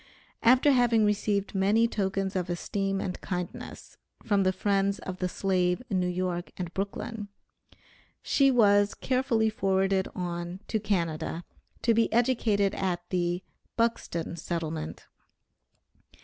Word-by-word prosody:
After 255 +5 +5
having 240 -4 +4
received 205 -1 0
many 205 +4 +3
tokens 195 -2 -1
of 180 -1 -1
esteem 195 +3 -1
and 185 -2 -4
kindness 180 -1 -6 0.3
from 205 -2 +2
the 185 -1 +3
friends 195 +1 +1
of 185 -1 -6
the 180 - -1
slave 180 +2 0
in 190 - +2
New 180 - +1
York 180 -1 -2
and 175 -2 -5
Brooklyn, 210 +2 -4 1.0
she 275 -1 +4
was 205 -5 +4
carefully 240 -4 +1
forwarded 195 -1 +1
on 175 0 -4
to 220 - +1
Canada, 170 -5 -2 0.4
to 230 - +4
be 230 0 +2
educated 225 -4 +2
at 180 -2 -2
the 175 0 0 0.3
"Buxton 225 -8 -1
Settlement." 160 -1 -4
195 Hz, 125 wpm, -28 LUFS, 180-215 Hz, 1.0 s, After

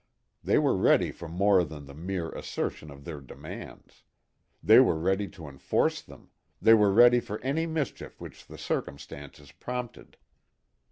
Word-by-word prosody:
They - - +2
were - - +2
ready - - +3
for 85 - -10
more 95 +2 +3
than 75 -3 -8
the 70 - -12
mere 85 +1 -4
assertion 75 - -5
of 70 -1 -13
their 75 -4 -7
demands. 65 - -11 0.6
They 110 +8 +8
were 125 -11 +4
ready 95 +5 0
to 80 -6 -11
enforce 70 -1 -1
them, - - -17 0.3
they 115 - +6
were 105 -3 +5
ready 120 +4 +6
for 105 -2 -6
any 150 +6 -1
mischief 160 -4 -4
which - - -11
the - - -11
circumstances 70 0 -6
prompted. 125 -1 -7
95 Hz, 155 wpm, -28 LUFS, 75-115 Hz, 0.6 s, They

